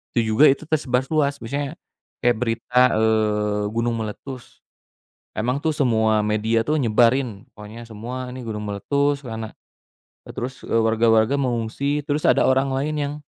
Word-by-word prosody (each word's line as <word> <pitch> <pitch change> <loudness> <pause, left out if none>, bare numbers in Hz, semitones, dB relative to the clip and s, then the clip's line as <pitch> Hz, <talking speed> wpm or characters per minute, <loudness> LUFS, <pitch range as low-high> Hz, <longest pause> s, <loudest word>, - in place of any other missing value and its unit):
itu 115 -2 +1
juga 140 +8 +6
itu 135 +3 +2
tersebar 130 -4 0
luas. 145 -3 +1
Misalnya 140 +5 -3 0.5
kayak 120 -2 +3
berita, 120 +1 0 0.2
eee, 105 -1 +1
gunung 115 0 0
meletus, 120 +4 -8 0.7
emang, 125 +5 -1
tuh, 160 0 0
semua 110 -6 +2
media, 110 +2 +1
tuh, 155 +5 0
nyebarin, 120 -2 +2
pokoknya 105 +2 -10
semua 120 +3 -7
ini 130 - -7
gunung 105 -1 -4
meletus 140 +8 0
lana 110 -1 -6 0.7
eee, - - -9
terus 125 +1 -5
warga-warga 115 +2 +3
mengungsi, 135 +3 -1
terus 150 +1 -1
ada - - +4
orang 135 +1 +2
lain 145 +3 -1
yang 145 0 -2
120 Hz, 145 wpm, -22 LUFS, 110-140 Hz, 0.7 s, juga